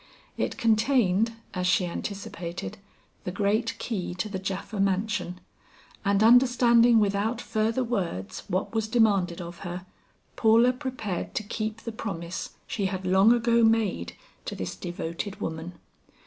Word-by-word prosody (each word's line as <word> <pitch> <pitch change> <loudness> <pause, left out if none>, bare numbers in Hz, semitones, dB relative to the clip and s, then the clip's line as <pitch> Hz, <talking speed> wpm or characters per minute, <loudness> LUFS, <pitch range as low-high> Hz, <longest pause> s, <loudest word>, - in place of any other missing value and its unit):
It - - -2
contained, 225 -2 +3 0.2
as 180 -1 -1
she 180 0 +3
anticipated, 170 - -5 0.4
the - - -3
great 205 +4 0
key 185 -6 -3
to 180 +3 -2
the 190 -2 -4
Japha 195 +2 -4
mansion, 195 -2 0 0.6
and 200 0 +3
understanding 240 -1 +6
without 210 +3 +1
further 225 +3 0
words, 175 - -3
what 185 +3 -2
was 220 -1 0
demanded 205 -7 +2
of 170 0 -8
her, 180 0 -6 0.5
Paula 230 +3 +5
prepared 250 -8 -4
to - - -1
keep 215 +1 -4
the 230 - -5
promise 180 -6 -5
she 200 -3 -1
had 190 -1 -4
long 190 +4 +5
ago 235 -1 +3
made 220 - +2 0.3
to - - -4
this 90 -1 -4
devoted 175 +2 -5
woman. 160 +2 -4
205 Hz, 135 wpm, -27 LUFS, 180-225 Hz, 0.6 s, understanding